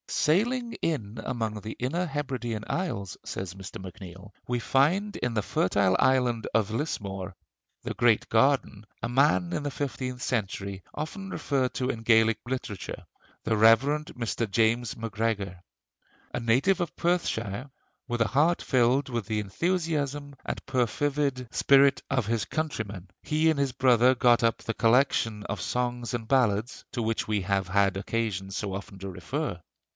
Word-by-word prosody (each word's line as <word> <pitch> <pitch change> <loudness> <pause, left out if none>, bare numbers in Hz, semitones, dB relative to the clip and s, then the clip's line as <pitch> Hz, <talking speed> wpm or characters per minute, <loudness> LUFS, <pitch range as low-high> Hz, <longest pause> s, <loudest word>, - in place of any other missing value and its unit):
"Sailing 230 +9 +1
in 115 -9 -2
among 110 -3 -2
the 110 +2 -6
inner 165 +9 -1
Hebridean 130 -8 -3
Isles," 100 - -3
says 95 -2 -5
Mr. 95 0 -9
MacNeill, 95 0 -10 0.2
"we 120 0 0
find 175 - +2
in 125 -2 -2
the 110 - +2
fertile 95 -1 +2
island 125 -4 +2
of 110 -2 +2
Lismore 100 - -3 0.5
'the - - -3
great 120 -3 +3
garden' 115 -3 +2 0.2
a - - -1
man 145 +7 +3
in 150 - -2
the 145 - -2
fifteenth 130 -2 -4
century 100 -6 -2
often 195 +6 -5
referred 135 -8 -1
to 130 0 -1
in 115 - -3
Gaelic 110 -1 +4
literature: 120 -7 -5 0.4
the 110 - +1
Rev. 110 +2 +7
Mr. 125 -7 -2
James 115 +3 +1
Macgregor. 105 -5 -2 0.7
A - - -1
native 130 +12 +2
of 170 - -3
Perthshire,... 130 - -1 0.4
with 120 -2 -2
a 115 - +4
heart 155 +8 +2
filled 130 +2 +2
with 120 -6 -3
the 110 -1 0
enthusiasm 145 - -1
and - - -4
perfervid 130 +1 0
spirit 140 0 +5
of 130 -5 +1
his 115 +1 0
countrymen, 110 - -4
he 155 +1 +2
and 155 -3 +1
his 140 -2 +1
brother 125 0 +4
got 120 -1 +4
up 115 -1 +3
the 115 - -3
collection 115 -3 +2
of 100 -3 -4
songs 125 -1 -2
and 115 -2 -5
ballads" 120 -3 +1
to 120 - -2
which 110 0 -1
we 105 -2 0
have 95 0 0
had 95 0 +2
occasion 100 -2 -2
so 100 0 -3
often 100 0 -7
to 95 +1 -5
refer. 90 - -4
120 Hz, 155 wpm, -27 LUFS, 105-140 Hz, 0.7 s, Rev